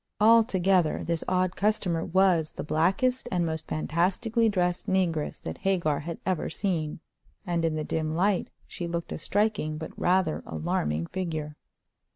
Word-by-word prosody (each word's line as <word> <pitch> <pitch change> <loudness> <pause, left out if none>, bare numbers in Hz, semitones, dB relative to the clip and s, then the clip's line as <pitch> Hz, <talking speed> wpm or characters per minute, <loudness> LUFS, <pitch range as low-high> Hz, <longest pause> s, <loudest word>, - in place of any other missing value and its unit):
Altogether, 195 -6 +4
this 170 -1 -1
odd 185 -1 +1
customer 195 -5 +1
was 180 -4 +2
the - - -5
blackest 190 - +1
and 175 -2 +1
most 160 -1 -3
fantastically 190 +9 +1
dressed 180 -3 0
negress 175 -5 0
that 80 - -6
Hagar 170 -7 +1
had 165 +3 -5
ever 185 -4 0
seen, 160 -6 -2 0.4
and 170 -2 0
in 165 -1 +1
the 155 - -2
dim 155 0 -2
light 190 +2 +1 0.2
she 175 - -5
looked 170 0 -4
a - - -4
striking 205 -6 0
but 160 0 -6
rather 180 -3 +1
alarming 75 0 -1
figure. 155 - -4
175 Hz, 150 wpm, -27 LUFS, 155-190 Hz, 0.4 s, Altogether